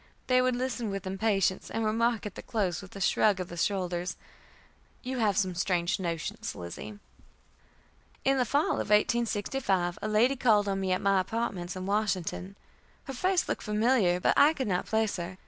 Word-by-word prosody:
They 255 0 +4
would 255 -1 +1
listen 245 -3 -2
with 195 0 -4
impatience, 195 -1 0
and 225 0 -2
remark 225 +1 +1
at 210 - -5
the - - -8
close, 195 -7 -1
with 195 0 -13
a - - -6
shrug 195 +1 +3
of 180 - -4
the 175 - -7
shoulders, 180 -1 -1 0.9
"You 255 0 -3
have 205 -4 +2
some 190 -3 +1
strange 175 0 0
notions, 170 -3 -4
Lizzie." 90 - -8 1.3
In 270 0 +3
the - - +4
fall 285 +6 +1
of - - -6
1865 210 -4 +1
a - - -2
lady 225 +6 +3
called 215 -5 +3
on 195 -1 -1
me 190 -1 -1
at 185 - +1
my 195 -1 +4
apartments 185 -3 -3
in 185 0 -5
Washington. 195 -2 -1 0.5
Her 270 - -7
face 365 +8 +1
looked - - -2
familiar, 210 -4 +2
but - - +2
I 300 +2 +6
could 265 -6 -3
not 180 -3 -1
place 220 -2 0
her. 180 +1 -6
205 Hz, 180 wpm, -29 LUFS, 185-235 Hz, 1.3 s, I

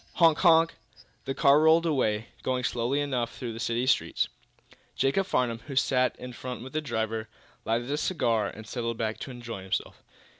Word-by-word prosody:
Honk! 165 -2 +4
honk! 165 -2 +5 0.5
The 135 - -3
car 140 +2 +5
rolled 160 +2 +5
away, 115 -8 0
going 130 -1 -1
slowly 125 +4 0
enough 125 -5 -2
through 120 -3 -5
the 115 - -7
city 120 +1 0
streets. 130 - +1 0.7
Jacob 185 +8 +1
Farnum, 120 -7 0
who 140 - -6
sat 130 -1 +2
in 125 0 -8
front 125 -1 -6
with 130 - -10
the 155 - 0
driver, 110 -5 -2 0.4
lighted 120 +4 -1
a 145 - 0
cigar 115 - +1
and 110 +1 -9
settled 115 0 -3
back 110 -1 -2
to - - -6
enjoy 120 -5 -7
himself. 95 0 -3
125 Hz, 180 wpm, -28 LUFS, 115-145 Hz, 0.7 s, honk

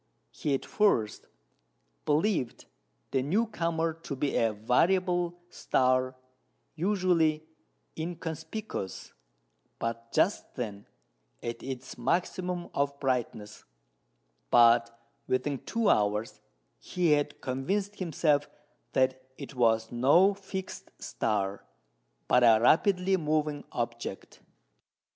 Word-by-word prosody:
He 145 -2 -1
at - - -5
first 120 - +1 0.8
believed 150 - 0 0.5
the 135 - +1
new 190 - +1
comer 165 -6 -1
to 160 -3 -7
be 140 +1 -1
a 115 -1 +3
variable 175 - +1
star 130 0 +1 0.6
usually 170 -3 +1 0.5
inconspicuous, 165 - -5 0.6
but 115 0 -4
just 180 +6 +1
then 105 -6 -5 0.6
at 115 0 -4
its 130 -1 -7
maximum 180 +6 -1
of 140 0 -1
brightness; 120 -5 -2 0.9
but 115 0 +6 0.4
within 130 +2 0
two 230 -2 -1
hours 105 +1 +1 0.4
he 175 - 0
had 145 -1 +1
convinced 195 +11 -2
himself 150 -4 +1 0.4
that 130 0 +2 0.2
it 140 -1 -8
was 115 -3 +2
no 145 +11 +5
fixed 190 -1 -7
star, 100 -3 -2 0.6
but 125 - +4
a 115 -2 +7
rapidly 185 - +3
moving 150 -2 -1
object. 115 -4 -5
140 Hz, 100 wpm, -29 LUFS, 120-175 Hz, 0.9 s, a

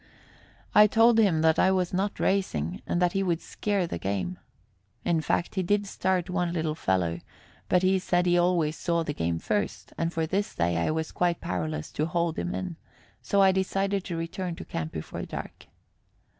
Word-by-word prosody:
I 210 0 +8
told 225 +2 +5
him 185 -8 +3
that 160 0 +4
I - - +5
was 185 -2 +1
not 195 +2 -1
racing 85 - 0
and 175 - 0
that 180 -1 +3
he 195 - 0
would 175 -4 0
scare 200 -1 -1
the 125 - -5
game. 90 -2 -2 0.7
In 165 -2 +2
fact, 170 - -1
he 190 - 0
did 205 +3 +1
start 190 -2 0
one 180 -2 -1
little 160 -2 -1
fellow, 90 - 0 0.5
but 180 0 +3
he 190 +1 +3
said 180 -1 +1
he 175 0 +3
always 175 -3 +2
saw 170 0 0
the 150 - -3
game 85 - -1
first, 205 - -2
and 165 0 0
for 165 -1 -1
this 195 +5 -2
day 85 0 +1
I 85 - +1
was 160 0 -2
quite 175 -1 0
powerless 80 -4 -3
to 155 - -1
hold 170 0 -1
him 175 - -2
in; 180 -3 -4 0.4
so 200 -1 +3
I 190 - +6
decided 195 +1 0
to 170 -3 -4
return 170 +1 -4
to - - -9
camp 80 -1 -4
before 80 - -6
dark. - - -7
175 Hz, 195 wpm, -27 LUFS, 155-190 Hz, 0.7 s, I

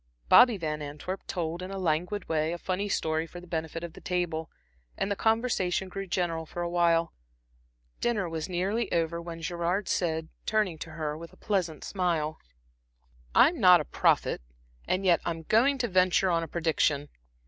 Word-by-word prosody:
Bobby 245 -4 +7
Van 155 -3 -3
Antwerp 150 +6 -6
told, 170 -1 -3
in 185 - -6
a 195 - -5
languid 180 +3 -1
way, 160 0 0
a - - -3
funny 190 +3 -2
story 160 -2 0
for 175 - -9
the 175 - -12
benefit 165 -1 -4
of 170 -2 -6
the - - -13
table, 175 -3 -2 0.5
and 200 - -1
the - - +1
conversation 220 -5 +1
grew 195 +1 -5
general 170 -3 -1
for 175 - -4
awhile. 170 -1 +2 0.9
Dinner 215 -6 0
was 165 +1 -4
nearly 195 +5 -1
over 170 0 0
when 165 -1 -8
Gerard 175 +4 -1
said, 160 -2 -1 0.2
turning 210 -7 +1
to 160 0 -7
her 155 -2 -3
with 165 +2 -10
a - - -18
pleasant 180 -7 -1
smile: 170 -5 -1 1.0
"I'm 325 +2 +5
not 180 -4 +8
a 150 - -3
prophet, - - +1 0.5
and 190 +1 0
yet 175 -2 +4
I - - -1
am 165 -1 -4
going 245 - +3
to 245 -2 0
venture 185 -1 +3
on 165 -1 +2
a 165 - -4
prediction. 150 -3 0
175 Hz, 180 wpm, -28 LUFS, 160-190 Hz, 1.0 s, not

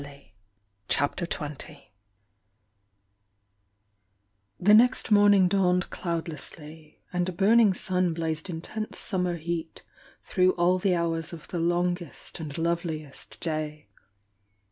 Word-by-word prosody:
Mr: 140 0 -12 0.6
CHAPTER 145 +5 0
XX 150 -1 -5 2.8
The 205 +4 +5
next 245 +2 +4
morning 205 -2 +6
dawned 180 -1 +2
cloudlessly, 160 -2 -6
and 180 0 0
a - - -2
burning 205 +2 +4
sun 180 -1 0
blazed 160 +1 -3
intense 200 +6 -5
summer 180 -4 -1
heat 165 0 -5 0.4
through 185 -1 +2
all 180 +1 +2
the 185 -1 +2
hours 165 -1 -1
of 165 - -10
the 175 - -3
longest 175 -1 -2
and 150 -3 -6
loveliest 165 -3 -3
day. 155 -6 -3
170 Hz, 105 wpm, -27 LUFS, 160-185 Hz, 2.8 s, morning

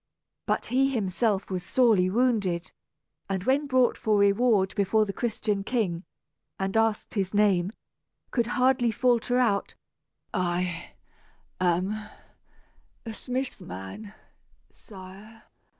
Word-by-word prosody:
But - - 0
he 260 +2 +2
was 270 - 0
himself 200 0 0 0.2
sorely 205 -3 +3
wounded, 200 -6 0 0.6
and 190 -2 -2
when 275 +6 +1
brought 255 -2 +2
for 215 -3 +2
reward 200 0 +3
before 215 +2 +2
the 195 - -4
Christian 215 -3 -1
king, 195 -7 -1 0.5
and 195 +1 -2
asked 225 -1 +1
his 195 -1 -1
name, 195 -3 +3 0.6
could 235 -3 +1
hardly 250 0 +2
falter 245 +1 +2
out, 220 -6 +1 0.6
"I 175 -1 -2 0.7
am 180 +2 +1 1.1
a 225 - -5
smith's 255 +3 -4
man, 95 - -8 0.6
sire." 200 +2 -13
210 Hz, 110 wpm, -27 LUFS, 190-240 Hz, 1.1 s, sorely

